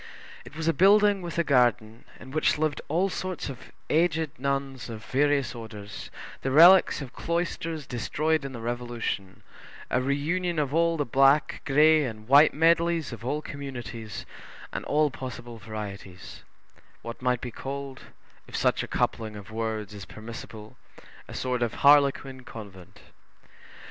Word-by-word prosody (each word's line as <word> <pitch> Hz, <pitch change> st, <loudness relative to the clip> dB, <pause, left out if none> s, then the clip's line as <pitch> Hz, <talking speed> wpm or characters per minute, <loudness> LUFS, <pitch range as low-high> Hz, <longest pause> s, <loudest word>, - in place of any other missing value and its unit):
It -, -, -13 dB
was 160 Hz, +1 st, -3 dB
a 165 Hz, -, +4 dB
building 200 Hz, +4 st, +5 dB
with 170 Hz, -2 st, -6 dB
a 170 Hz, -, +3 dB
garden, 120 Hz, -5 st, +1 dB
in 130 Hz, -, -11 dB
which 155 Hz, +1 st, +2 dB
lived 155 Hz, -1 st, -1 dB
all 175 Hz, +6 st, +1 dB
sorts 185 Hz, -4 st, -4 dB
of 130 Hz, -2 st, -10 dB, 0.2 s
aged 160 Hz, -2 st, +1 dB
nuns 135 Hz, -2 st, -2 dB
of 110 Hz, -1 st, -8 dB
various 145 Hz, 0 st, +1 dB
orders, 105 Hz, -3 st, -9 dB, 0.3 s
the 135 Hz, -, -1 dB
relics 170 Hz, +5 st, +7 dB
of 130 Hz, -1 st, -11 dB
cloisters 165 Hz, -2 st, -3 dB
destroyed 150 Hz, +6 st, -1 dB
in 135 Hz, -, -5 dB
the 120 Hz, -3 st, -8 dB
Revolution; 120 Hz, -5 st, -4 dB, 0.5 s
a 125 Hz, -, +2 dB
reunion 160 Hz, +6 st, -1 dB
of 145 Hz, -2 st, 0 dB
all 165 Hz, 0 st, +2 dB
the 145 Hz, -, 0 dB
black, 135 Hz, +4 st, +3 dB
gray, 155 Hz, +2 st, +5 dB
and 110 Hz, -4 st, -6 dB
white 140 Hz, +4 st, +7 dB
medleys 165 Hz, -1 st, +2 dB
of 115 Hz, -1 st, -9 dB
all 145 Hz, +5 st, -2 dB
communities 120 Hz, -6 st, -7 dB, 0.5 s
and -, -, -3 dB
all 150 Hz, 0 st, +2 dB
possible 120 Hz, -3 st, -8 dB
varieties; 100 Hz, -3 st, -8 dB, 0.6 s
what 115 Hz, +1 st, -7 dB
might 125 Hz, -1 st, +1 dB
be 125 Hz, -, -6 dB
called, 135 Hz, +1 st, -7 dB, 0.4 s
if -, -, -9 dB
such -, -, +2 dB
a -, -, -5 dB
coupling 110 Hz, -2 st, -1 dB
of 105 Hz, 0 st, -10 dB
words 110 Hz, -2 st, -3 dB
is 100 Hz, -2 st, -8 dB
permissible, 110 Hz, -1 st, -10 dB, 0.5 s
a -, -, -9 dB
sort 125 Hz, -1 st, -2 dB
of 120 Hz, -2 st, -1 dB
harlequin 140 Hz, -2 st, +4 dB
convent. 100 Hz, -4 st, -11 dB
135 Hz, 150 wpm, -27 LUFS, 115-155 Hz, 0.6 s, relics